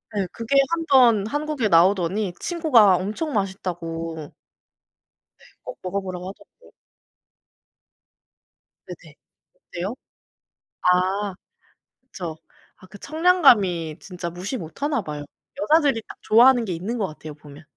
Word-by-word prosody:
네 200 - 0
그게 230 +4 -3 0.2
한번 255 -11 +4
한국에 290 -3 -2
나오더니 185 +2 +2
친구가 255 - +4
엄청 215 - -3
맛있다고. 165 -5 -4 1.1
네 - - -23 0.2
꼭 - - -8
먹어보라고 185 -1 -4
하더라고요. 200 - -16 2.2
네네. - - -12 0.4
어때요? 200 - -6 0.9
아 185 +2 +1 0.7
그쵸. 175 -11 -8 0.4
아 185 - -17
그 205 +2 -13
청량감이 245 - +3
진짜 180 -2 -7
무시 185 +9 -5
못하나봐요. 175 - -4 0.4
여자들이 295 -7 +3
딱 - - -11
좋아하는 245 +2 +5
게 185 - -3
있는 195 +9 -4
것 200 - -1
같아요 155 -1 -10
보면. 150 +1 -14
195 Hz, 250 characters per minute, -23 LUFS, 175-255 Hz, 2.2 s, 좋아하는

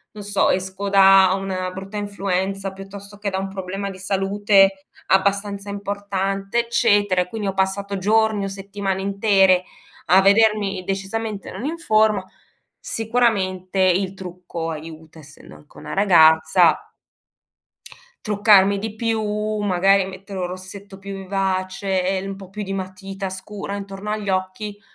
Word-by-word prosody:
non 205 - -8
so 205 0 +1
esco 190 +2 -2
da 195 -1 +6
una 185 -1 -3
brutta 195 +3 -7
influenza, 195 -1 -2
piuttosto 195 +1 -11
che 205 0 -3
da 190 - -3
un 195 0 -3
problema 195 +1 -5
di 190 - -9
salute 195 0 +2 0.2
abbastanza 200 +1 +1
importante 200 +1 -2
eccetera, 205 -5 +2
e 180 - -3
quindi 210 +1 -4
ho 195 - -1
passato 195 +1 -1
giorni, 215 +1 +2
o - - -2
settimane 195 0 -4
intere 195 -2 +3 0.4
a 185 +3 +6
vedermi 200 -2 +3
decisamente 200 +2 -4
non 195 +7 -6
in 320 +3 -3
forma, 215 - +2 0.6
sicuramente 200 -5 -1
il 185 +1 +2
trucco 180 -3 -7
aiuta, 160 0 -9
essendo 150 0 -15
anche 150 - -19
una - - -8
ragazza 160 -3 +4 1.4
truccarmi 205 -2 +4
di 215 +1 -5
più, 225 -1 -1 0.4
magari 195 -1 +3
mettere 195 +1 -8
un 180 - -1
rossetto 190 +2 -9
più 200 0 -8
vivace, 190 0 -2
e 190 0 -1
un 195 0 -5
po' 190 -2 -11
più 210 +2 -6
di 195 0 -5
matita 195 +1 -5
scura 195 +2 -6
intorno 195 +1 -7
agli 210 -2 -2
occhi, 190 +2 -3
195 Hz, 140 wpm, -21 LUFS, 190-205 Hz, 1.4 s, da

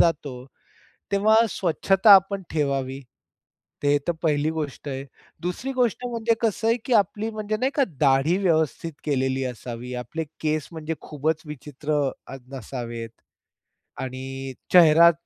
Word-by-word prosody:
जातो. 150 -4 +2 0.8
तेव्हा 210 +2 +4
स्वच्छता 195 +4 +4
आपण 195 +1 +2
ठेवावी, 135 -3 -1 0.8
ते 145 0 +4
तर 175 - +3
पहिली 150 -1 +2
गोष्ट 150 -2 -5
आहे. 135 +1 -4 0.4
दुसरी 180 +10 -3
गोष्ट 245 -1 0
म्हणजे 230 -1 +1
कसं 225 0 0
आहे, 230 +2 +3
की 255 - +1
आपली 210 +1 +2
म्हणजे 215 0 -3
नाही 260 +4 0
का, 280 - +4 0.2
दाढी 140 +5 +3
व्यवस्थित 160 -1 +1
केलेली 135 -2 0
असावी. 125 0 -6
आपले 160 +7 -4 0.2
केस 155 -1 0
म्हणजे 160 0 -4
खूपच 155 +2 -2
विचित्र 150 +1 -5 0.3
अ, - - -7 0.2
नसावेत 120 -2 -6 0.9
आणि 130 +1 -6 0.2
चेहरा 170 -1 +8
155 Hz, 130 wpm, -24 LUFS, 135-195 Hz, 0.9 s, चेहरा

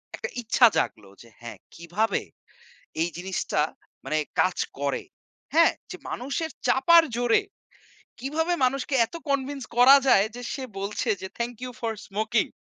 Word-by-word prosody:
একটা 475 - -5
ইচ্ছা 235 +2 +5
জাগলো 100 -3 -2
যে 115 - -16
হ্যাঁ 120 - -8 0.2
কিভাবে 180 +5 -1 0.8
এই 170 - +1
জিনিসটা 180 -4 -2 0.4
মানে 155 +3 0 0.2
কাজ 185 -1 +2 0.2
করে, 140 -1 -1 0.5
হ্যাঁ? 330 +1 +5 0.2
যে - - -7
মানুষের 280 +6 -3 0.2
চাপার 335 +5 +6
জোরে 245 - +2 0.8
কিভাবে 320 +6 -1
মানুষকে 270 +2 0
এত - - -18 0.2
কনভিন্স 275 -1 -1
করা 260 +3 +9
যায় 200 -4 +5
যে 245 - -7
সে 270 - -5 0.2
বলছে 200 +2 -3
যে 190 - -5
"Thank 240 +1 -2
You 250 - -5
for 230 -2 -1
Smoking" 220 +2 0
240 Hz, 145 wpm, -26 LUFS, 190-275 Hz, 0.8 s, করা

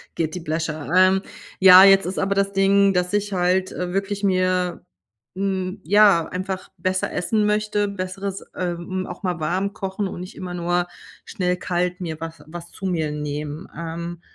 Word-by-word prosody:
Guilty 165 +2 -2
pleasure, 155 -1 -3
ähm, 185 +1 +5 0.4
ja, 185 0 +10
jetzt 195 -1 +6
ist 185 +2 -3
aber 195 +1 0
das 200 0 0
Ding, 195 0 +4
dass 180 +1 0
ich 205 0 0
halt, 185 +1 +1
äh, 180 0 -4
wirklich 195 +1 -2
mir 185 -2 0 0.5
hm, 190 0 -2
ja, 195 -3 +5
einfach 185 +1 -5
besser 185 +2 -1
essen 210 +4 0
möchte. 210 0 +1
Besseres, 195 0 -5
äh, 180 -1 -2
hm 185 +2 -5
auch - - -9
mal 180 -2 -2
warm 185 +6 -1
kochen 195 0 -3
und 185 - -7
nicht 185 - -9
immer 180 -1 -6
nur 175 0 0 0.4
schnell 180 -4 -1
kalt 180 0 -2
mir 160 -3 -5
was 165 -2 -7
was 170 +1 -9
zu 195 - -8
mir 165 -5 -1
nehmen. 150 +2 -5
Ähm, 170 +1 -6
185 Hz, 170 wpm, -22 LUFS, 175-195 Hz, 0.5 s, ja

